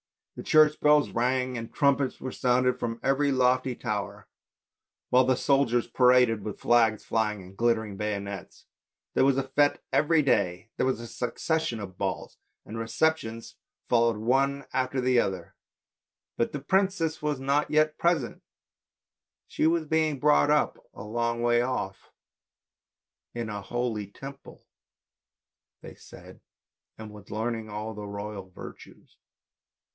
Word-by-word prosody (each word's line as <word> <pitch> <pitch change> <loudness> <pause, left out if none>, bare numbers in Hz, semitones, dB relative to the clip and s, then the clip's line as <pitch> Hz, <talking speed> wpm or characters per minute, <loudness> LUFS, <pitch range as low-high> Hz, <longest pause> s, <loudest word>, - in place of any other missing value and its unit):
The - - -7
church 155 -1 +5
bells 150 0 +4
rang 125 +1 0
and 115 -1 -6
trumpets 140 -2 +1
were 130 - -5
sounded 125 0 +1
from 115 -1 -3
every 140 +1 +2
lofty 130 0 +2
tower, 105 -6 -4 0.8
while 125 +1 +6
the 130 0 +3
soldiers 135 -3 +2
paraded 125 -4 +3
with 105 - -6
flags 115 -3 +2
flying 105 -3 -1
and 95 +1 -14
glittering 110 -2 0
bayonets. 100 -2 -5 0.5
There - - +3
was 135 -1 +3
a 135 - +1
fete 145 +2 +2
every 155 0 +3
day, 115 -5 0
there - - +1
was 130 -4 0
a 120 - -7
succession 125 +2 -2
of 95 -3 -9
balls, - - -3 0.3
and 115 +1 -7
receptions 115 -1 -1 0.3
followed 115 -2 +3
one 135 +5 +1
after 130 0 -1
the 125 -1 +3
other, 95 -6 -2 0.8
but 115 - 0
the 145 - -4
princess 190 -1 0
was 150 -2 -1
not 140 +2 0
yet 155 0 +2
present, 170 -8 0 1.0
she - - 0
was 165 -1 +1
being 155 -1 +1
brought 75 -9 +4
up - - +2 0.2
a - - -8
long 115 +2 -2
way 120 0 +3
off, 120 -6 -4 1.3
in 115 -2 -4
a 105 -1 -5
holy 110 0 -3
Temple 135 +7 -12 1.2
they - - -10
said, - - -15 0.6
and 110 -1 -9
was 105 -1 -14
learning 110 0 -3
all 105 +1 -5
the 105 0 -7
royal 100 -1 -7
virtues. 90 - -13
120 Hz, 140 wpm, -27 LUFS, 110-140 Hz, 1.3 s, while